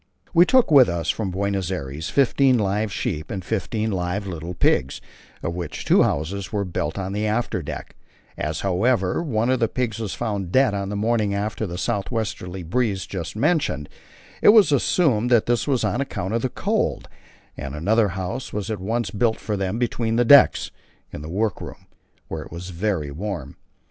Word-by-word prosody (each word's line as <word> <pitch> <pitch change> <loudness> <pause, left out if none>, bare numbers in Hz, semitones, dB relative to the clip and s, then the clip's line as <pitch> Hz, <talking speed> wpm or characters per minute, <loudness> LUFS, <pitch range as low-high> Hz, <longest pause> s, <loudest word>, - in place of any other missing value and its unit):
We 175 +1 +6
took 255 -8 +4
with 135 -7 +7
us 85 -3 0
from 110 -4 -3
Buenos 95 -1 -1
Aires 75 -3 -4
fifteen 135 -1 +3
live 105 0 0
sheep 75 -5 -3
and 95 -3 -5
fifteen 110 +1 -2
live 90 +2 -2
little 85 -1 -6
pigs, 65 -5 +1 0.4
for 85 - -2
which 85 -3 -5
two - - +5
houses 95 +6 -1
were 100 -2 -1
built 80 -2 -3
on 95 0 -3
the 105 +1 -1
after 110 -3 -1
deck; 70 - -7 0.4
as, 75 0 -3
however, 95 - +1
one 120 -6 0
of 130 - +1
the 115 - +2
pigs 115 -1 -2
was 110 -4 -3
found 100 -5 -3
dead 130 -1 +4
on 100 -1 -2
the 105 - -3
morning 105 -1 +1
after 105 +1 -2
the 85 0 -6
south 100 +1 -2
westerly 95 -6 -4
breeze 100 +2 -1
just 90 -2 -6
mentioned, 140 - 0 0.6
I - - +5
assumed 150 - +4
that 120 -3 +4
this 120 -2 0
was 135 -4 +1
on 125 - 0
account 110 -7 -3
of 115 - +1
the 130 - -1
cold, - - -1 0.5
and 70 +1 -6
another 105 +8 +2
house 95 +7 -4
was 105 0 -3
at 105 -4 -4
once 110 +1 -1
built 110 +2 +1
for 105 - -3
them 95 +1 -2
between 115 -1 -1
decks 120 +4 +6 0.4
(in - - -7
the 75 - -7
work 105 +3 -1
room), - - -9 0.4
where 80 - -5
it - - -11
was 90 +3 -7
very 85 -5 -2
warm. 85 -4 -5
100 Hz, 185 wpm, -23 LUFS, 90-115 Hz, 0.6 s, with